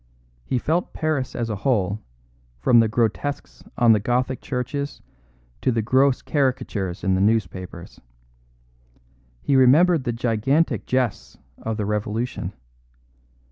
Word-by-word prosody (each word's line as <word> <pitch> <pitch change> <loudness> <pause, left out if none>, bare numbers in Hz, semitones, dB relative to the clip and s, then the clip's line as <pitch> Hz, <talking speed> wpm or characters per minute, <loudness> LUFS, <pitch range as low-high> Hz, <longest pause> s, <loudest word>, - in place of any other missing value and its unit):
He 125 - -1
felt 165 +8 -1
Paris 145 -5 -2
as 115 -2 -2
a 105 - -3
whole, 100 -2 0 0.6
from 115 - +4
the 115 - +4
grotesques 110 - -2
on 120 -1 +5
the 110 - +5
Gothic 125 +4 -1
churches 140 +3 -4 0.6
to 130 - +2
the 115 -2 0
gross 130 +3 +3
caricatures 120 - -1
in 95 - +2
the 95 - +1
newspapers. 95 -5 -2 1.4
He 140 - +2
remembered 145 +5 +5
the 120 - 0
gigantic 120 +7 0
jests 125 -4 -1 0.2
of 110 -1 -3
the 105 - -2
Revolution. 105 -1 -2
120 Hz, 125 wpm, -23 LUFS, 105-130 Hz, 1.4 s, on